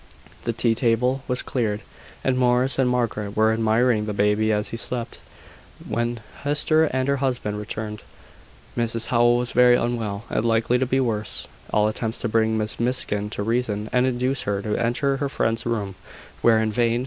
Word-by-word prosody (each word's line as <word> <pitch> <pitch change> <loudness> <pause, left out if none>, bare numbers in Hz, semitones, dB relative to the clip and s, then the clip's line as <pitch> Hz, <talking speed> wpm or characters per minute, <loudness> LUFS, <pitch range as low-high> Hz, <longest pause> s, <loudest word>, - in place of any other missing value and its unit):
The 115 - +1
tea 115 0 +2
table 125 +3 +1
was 125 -1 0
cleared, 110 -5 -1 0.4
and 130 - +1
Morris 125 +1 +2
and 130 -2 +3
Margaret 110 -4 -2
were 110 0 +4
admiring 110 0 +2
the 105 - -2
baby 105 +2 +2
as 105 0 -1
he - - -5
slept, 120 0 -4 0.7
when 120 0 -2 0.2
Hester 155 +2 +2
and 130 -3 -1
her 140 0 +2
husband 125 -6 -2
returned. 105 0 -5 0.7
Mrs 115 -1 0
Howell 120 0 +4
was 120 0 -1
very 125 0 +6
unwell, 115 -4 -2
and - - 0
likely 115 +1 +2
to 130 - 0
be 135 +2 +1
worse. 110 -5 -1 0.2
All 105 0 +3
attempts 110 +1 -3
to 120 - -1
bring 110 0 +1
Miss 110 0 -2
Miskin 115 -4 0
to 105 - -4
reason, 110 -2 -1
and 125 0 +3
induce 130 +1 0
her 100 0 -1
to 105 -1 -1
enter 130 +4 0
her 140 0 -2
friend's 115 -3 -1
room, 105 -4 -2 0.5
were 115 -1 +5
in 110 0 +1
vain. 120 +1 +1
115 Hz, 180 wpm, -23 LUFS, 110-125 Hz, 0.7 s, very